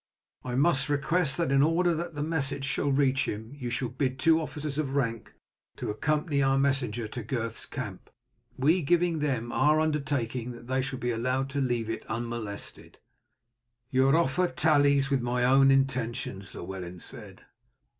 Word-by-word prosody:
I 125 -1 -3
must 140 0 +2
request 145 +1 +1
that 170 -5 0
in 135 0 +4
order 170 +3 +3
the 160 -2 -3
message 145 -3 -1
shall 140 0 0
reach 135 -1 +2
him 110 +4 -5
you 130 -4 -5
shall 120 +1 -2
bid 130 +1 -2
two 165 +3 +4
officers 150 -2 -4
of 140 -3 -2
rank 115 -5 -2 0.4
accompany 150 +6 0
our 135 0 +3
messenger 130 -5 0
to 120 - -5
Gurth's 115 0 -4
camp; 110 -9 -7 0.5
we 155 +7 +3
giving 170 +2 +2
them 130 -6 -1
our 150 +1 +3
undertaking 135 -6 -1
that 120 0 -12
they 130 +1 0
shall 130 0 -4
be 125 -1 -1
allowed 130 +3 -1
to 140 0 -1
leave 120 -4 0
it 115 - -4
unmolested." 115 -3 -5 0.9
"Your 135 +2 +4
offer 170 +2 +2
tallies 145 -4 +3
with 135 -2 +2
my 120 +1 0
own 135 +2 +6
intentions," 120 -8 0
Llewellyn 90 -1 -6
said. - - -11
135 Hz, 155 wpm, -28 LUFS, 120-145 Hz, 0.9 s, own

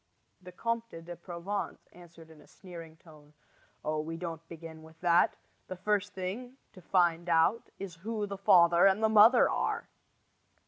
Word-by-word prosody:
The 180 0 -11
Comte 230 -6 -4
de 175 0 -7
Provence 175 +4 -6
answered 170 -2 -16
in 155 - -16
a - - -20
sneering 165 -4 -12
tone: 150 -2 -18 0.5
"Oh, 155 0 -1
we 165 +2 -5
don't 165 -2 -6
begin 165 -1 -10
with 160 0 -16
that. 175 -1 +3 0.3
The 185 - -6
first 205 +2 -1
thing 225 +8 -6 0.2
to 185 - -14
find 175 -1 +1
out 165 +7 +2
is 185 -4 -8
who 210 +4 -3
the 200 -1 -6
father 175 -1 +6
and 195 +3 +2
the 220 - +4
mother 220 +3 +7
are!" - - -2
175 Hz, 165 wpm, -30 LUFS, 165-200 Hz, 0.5 s, mother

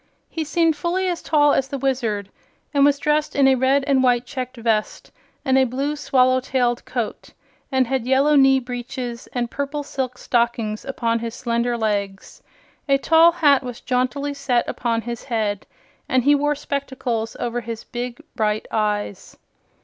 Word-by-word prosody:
He 325 - -2
seemed 325 +1 +2
fully 350 +5 -1
as 350 -2 -2
tall 295 -2 +3
as 265 - +1
the 275 - -4
Wizard, 235 -7 -1 0.4
and 280 -1 +4
was 285 0 +4
dressed 300 +1 0
in 275 -1 +5
a 265 - +6
red 265 +2 +2
and 275 -2 +3
white 245 -1 +2
checked 255 -1 -6
vest 225 -2 -1 0.3
and 265 -1 +4
a - - +5
blue 270 +4 -2
swallow 255 -3 +3
tailed 250 -2 0
coat, 235 -4 -4 0.4
and 260 -1 +3
had 255 -1 -2
yellow 275 +3 +4
knee 270 -1 +6
breeches 245 -1 -6
and 240 -2 -2
purple 285 +1 -3
silk 260 -3 -4
stockings 235 -4 -1
upon 230 -4 -1
his 230 0 -5
slender 235 0 -1
legs. 200 -3 -3 0.5
A 275 - +5
tall 325 +4 +5
hat 290 -5 +4
was 250 -3 -7
jauntily 255 +3 -1
set 265 -4 0
upon 230 -1 -1
his 235 -1 -6
head 215 -5 -2 0.4
and 255 -1 +2
he 290 +3 +5
wore 290 +1 +1
spectacles 260 -6 -3
over 240 0 -2
his 230 0 -6
big 245 +1 -6 0.2
bright 215 -2 0
eyes. 210 -2 -2
255 Hz, 165 wpm, -22 LUFS, 235-280 Hz, 0.5 s, a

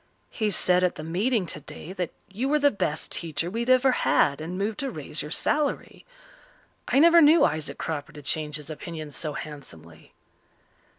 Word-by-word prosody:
"He 215 -2 -1
said 180 -2 +3
at 180 - +1
the 155 - -7
meeting 195 +6 0
today 155 +2 -8
that 180 -3 -3 0.2
you 220 +7 -3
were 300 - +3
the 285 -1 +4
best 160 -6 -3
teacher 165 +1 -3
we 225 - -3
had 235 +1 -2
ever 255 +1 +5
had 140 - +2
and 175 +3 -5
moved 205 +2 -2
to 275 - -2
raise 150 - -5
your 150 - -6
salary. 295 - -1 0.8
I - - +1
never 335 +3 +7
knew 315 +2 +7
Isaac 150 -2 -2
Cropper 155 0 -4
to 150 -2 -11
change 150 +1 -2
his 150 0 -6
opinions 155 -2 -7
so 155 -2 -3
handsomely." 85 - -10
170 Hz, 180 wpm, -26 LUFS, 150-235 Hz, 0.8 s, never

